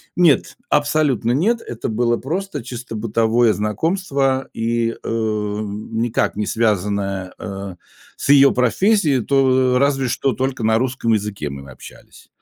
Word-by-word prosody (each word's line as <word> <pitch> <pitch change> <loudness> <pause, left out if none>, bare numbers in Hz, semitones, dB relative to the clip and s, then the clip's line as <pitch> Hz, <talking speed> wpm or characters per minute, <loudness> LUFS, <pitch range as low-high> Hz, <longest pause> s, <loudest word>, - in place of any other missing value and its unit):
Нет, 170 -5 +3
абсолютно 145 -5 +1
нет, 220 - +1
это 120 0 -5
было 120 +1 +1
просто 165 0 -4
чисто 120 -1 -7
бытовое 115 +1 +2
знакомство 135 - -1
и, 115 0 0
э, - - -10
никак 110 +1 -2
не 105 +1 -2
связанное, 100 -3 -1
э, 100 -3 -7 0.4
с - - -5
её 140 -1 +7
профессией, 145 - +2
то 130 -1 +3
разве 135 -1 +1
что 130 +2 0
только 130 0 -2
на 110 0 +3
русском 125 -2 0
языке 100 -8 -2
мы 70 0 -9
общались. 65 - -14
120 Hz, 130 wpm, -20 LUFS, 105-135 Hz, 0.4 s, её